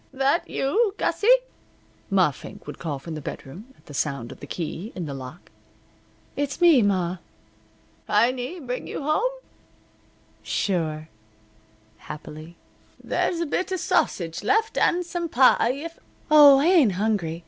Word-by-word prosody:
"That 275 +4 0
you, 400 +9 0
Gussie?" 415 - -1 0.8
Ma 185 -6 +3
Fink - - -12
would 150 - -9
call 155 -4 -3
from 160 +5 -8
the 155 - -6
bedroom, 180 - -9
at - - -27
the 145 - -12
sound 140 -4 -2
of - - -12
the - - -10
key 175 +5 -5
in 180 - -4
the 145 - -5
lock. 135 +5 -10 0.8
"It's 285 +1 -3
me, 335 -7 +6
ma." 185 -3 0 0.9
"Heiny 255 +7 +1
bring 250 0 -4
you - - -5
home?" 310 - +1 1.1
"Sure," 155 -5 -2 0.9
happily. 155 +4 -10 0.5
"There's 340 - -1
a - - 0
bit 370 +5 -2
of 375 - -1
sausage 175 - 0
left, 435 - +1
and 355 0 +2
some 345 -1 -4
pie 255 -2 +4
if 330 +5 -8 0.2
" - - -29
"Oh, 290 -2 +9
I 280 - +2
ain't 325 - +5
hungry. 185 -5 -1
230 Hz, 150 wpm, -24 LUFS, -, 1.1 s, Oh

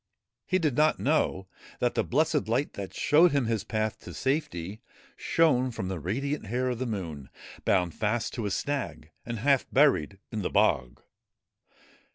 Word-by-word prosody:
He 185 - +2
did 155 -8 0
not 155 +2 +3
know 135 -10 +1 0.3
that 120 - 0
the - - +1
blessed 155 +1 +1
light 125 +6 0
that 100 -2 -6
showed 160 +3 +4
him 140 -4 +2
his 110 -3 -1
path 110 -1 -2
to - - -10
safety 125 - -2 0.3
shone 135 -6 +2
from 95 -6 -4
the 95 -3 -3
radiant 130 - -2
hair 125 +4 0
of 120 - -4
the 130 - -2
Moon, 85 - -5 0.4
bound 90 -3 +2
fast 110 +2 -1
to 115 -4 -2
a - - -1
snag 130 - -3 0.2
and 115 -1 -3
half 135 +4 +2
buried 130 - +3
in 110 - -3
the 90 - -1
bog. 70 - +1
120 Hz, 170 wpm, -28 LUFS, 100-140 Hz, 0.4 s, showed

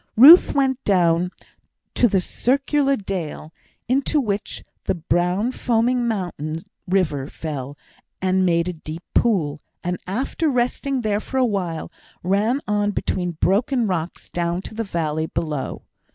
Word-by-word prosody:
Ruth 300 +10 +9
went 270 -2 +1
down 175 -2 +3 0.6
to 245 - +4
the 195 -4 +2
circular 275 +6 +1
dale, 175 - -5 0.3
into 275 +4 +2
which 205 -6 -3 0.2
the - - 0
brown 180 +7 0
foaming 240 0 +1
mountain 175 -8 -3 0.3
river 165 -8 0
fell 145 -3 -6 0.4
and 190 0 +2
made 170 -1 +2
a 180 - -2
deep 160 +1 -8
pool, 160 -10 +1 0.2
and, 180 0 -2
after 265 - -1
resting 255 +1 0
there 210 -2 0
for 265 - -5
a 260 - +4
while, 185 -7 -2 0.3
ran 210 +9 +1
on 205 0 +1
between 180 -3 -2
broken 235 +6 +2
rocks 180 -4 -3
down 175 +1 -1
to - - -8
the 225 +1 -2
valley 160 -5 -2
below. 150 -5 -3
195 Hz, 135 wpm, -22 LUFS, 170-240 Hz, 0.6 s, Ruth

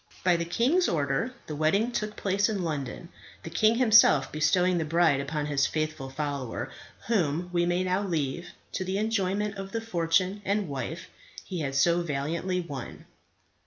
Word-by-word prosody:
By 180 -1 +4
the 170 0 -1
king's 260 - +2
order, 145 - 0
the 150 - -5
wedding 195 +11 +2
took 210 -3 -3
place 200 +2 +1
at 210 -2 -1
London, 160 -1 -4 0.3
the 165 - -7
king 215 +6 +3
himself 220 - +5
bestowing 175 +4 +2
the - - 0
bride 160 -2 +3
upon 145 +1 -3
his 145 -1 +1
faithful 155 -3 -3
follower, 140 -3 -4 0.3
whom 175 -5 0
we 175 0 +2
may 175 +1 +1
now 185 +1 0
leave 170 -2 -2 0.2
to 185 - -2
the 190 +1 -2
enjoyment 210 -1 -1
of 195 0 -7
the 230 - 0
fortune 185 -1 0
and 200 0 0
wife 135 -4 -5 0.4
he 180 - -4
had 135 -3 -3
so 170 +4 +3
valiantly 170 +4 -2
won. 140 -7 -8
175 Hz, 165 wpm, -28 LUFS, 150-200 Hz, 0.4 s, himself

